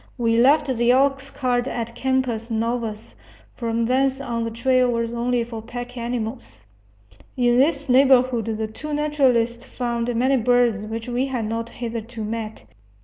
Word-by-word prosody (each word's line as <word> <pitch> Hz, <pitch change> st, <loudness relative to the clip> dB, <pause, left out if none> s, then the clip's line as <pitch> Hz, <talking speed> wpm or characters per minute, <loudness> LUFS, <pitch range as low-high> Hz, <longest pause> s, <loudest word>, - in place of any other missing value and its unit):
We 230 Hz, -2 st, +1 dB
left 280 Hz, +6 st, +5 dB
the 240 Hz, -3 st, 0 dB
oxcart 265 Hz, -1 st, +1 dB
at 235 Hz, -2 st, -4 dB
Campos 250 Hz, -2 st, -1 dB
Novos; 225 Hz, -1 st, -3 dB, 0.4 s
from 230 Hz, -1 st, -1 dB
thence 265 Hz, +2 st, +1 dB
on 235 Hz, -4 st, -3 dB
the 230 Hz, -, -2 dB
trail 255 Hz, +2 st, +2 dB
was 230 Hz, -1 st, -1 dB
only 240 Hz, 0 st, 0 dB
for 230 Hz, -1 st, -7 dB
pack 245 Hz, +2 st, -7 dB
animals. 235 Hz, -, -5 dB, 0.7 s
In 245 Hz, -1 st, +3 dB
this 280 Hz, +1 st, +2 dB
neighborhood 255 Hz, -2 st, +4 dB
the 220 Hz, -1 st, -2 dB
two 295 Hz, +8 st, -6 dB
naturalists 255 Hz, -6 st, +1 dB
found 240 Hz, -2 st, -3 dB
many 260 Hz, +3 st, +2 dB
birds 245 Hz, -2 st, +3 dB
which 225 Hz, +1 st, -5 dB
we 250 Hz, +2 st, -1 dB
had 250 Hz, -4 st, -2 dB
not 230 Hz, +1 st, -3 dB
hitherto 230 Hz, -1 st, -6 dB
met. 220 Hz, -, -5 dB
240 Hz, 145 wpm, -22 LUFS, 230-260 Hz, 0.7 s, left